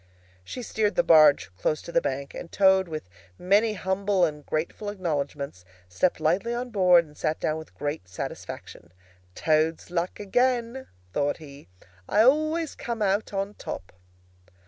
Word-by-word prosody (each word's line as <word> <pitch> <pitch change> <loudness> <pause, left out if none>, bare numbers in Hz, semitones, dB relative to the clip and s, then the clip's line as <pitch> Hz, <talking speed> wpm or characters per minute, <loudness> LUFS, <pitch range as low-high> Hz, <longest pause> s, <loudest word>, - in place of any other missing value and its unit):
She 245 - -7
steered 215 -2 0
the 260 - +3
barge 155 - +6
close 155 +8 0
to - - -8
the 170 - +3
bank, 140 +1 -3
and 170 - -8
Toad, 190 -1 +4
with 155 - -6 0.3
many 205 +4 +3
humble 190 -1 +1
and 150 -2 -5
grateful 165 +8 -3
acknowledgments, 145 - -3 0.2
stepped 95 - 0
lightly 180 +10 +1
on 245 +1 -4
board 180 -4 +5
and 150 -1 -18
sat 155 +1 -1
down 155 - -1
with 160 - -13
great 145 -11 -4
satisfaction. 85 -1 -8 0.4
"Toad's 155 +2 +1
luck 175 0 -2
again!" 245 +4 0 0.3
thought 145 0 0
he. 145 -2 -13 0.4
"I 210 +2 +5
always 310 +4 +2
come 235 -2 -3
out 200 +2 0
on 195 0 -2
top!" 95 - -7
180 Hz, 150 wpm, -26 LUFS, 155-210 Hz, 0.4 s, barge